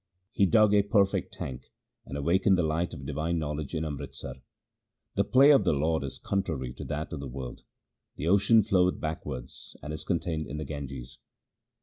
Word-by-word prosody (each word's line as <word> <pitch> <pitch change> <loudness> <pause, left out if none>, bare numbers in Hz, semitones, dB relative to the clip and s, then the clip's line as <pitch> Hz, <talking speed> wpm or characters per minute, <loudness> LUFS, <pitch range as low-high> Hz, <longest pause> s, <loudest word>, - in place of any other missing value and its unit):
He 100 - +3
dug 105 +3 +5
a 105 - +6
perfect 100 -1 +2
tank, 65 -1 -7 0.4
and 70 - -5
awakened 90 +6 +3
the 90 - +2
light 80 +2 0
of 70 - -9
divine 75 +4 -1
knowledge 75 -1 -3
in 80 0 -1
Amritsar. 75 -3 -6 0.8
The 100 - +2
play 135 +6 +6
of 140 - +6
the - - +2
Lord 80 +1 +1
is 70 - -5
contrary 80 -11 -2
to - - -8
that 75 +2 -4
of 80 - -4
the 70 - -5
world; 65 -1 -7 0.5
the 80 - -4
ocean 100 +4 +5
floweth 90 -2 +2
backwards, 75 -5 -6
and 75 - -5
is 75 - -4
contained 85 -4 -1
in 70 +3 -5
the 75 - -4
Ganges. 70 -4 -7
80 Hz, 185 wpm, -28 LUFS, 70-95 Hz, 0.8 s, a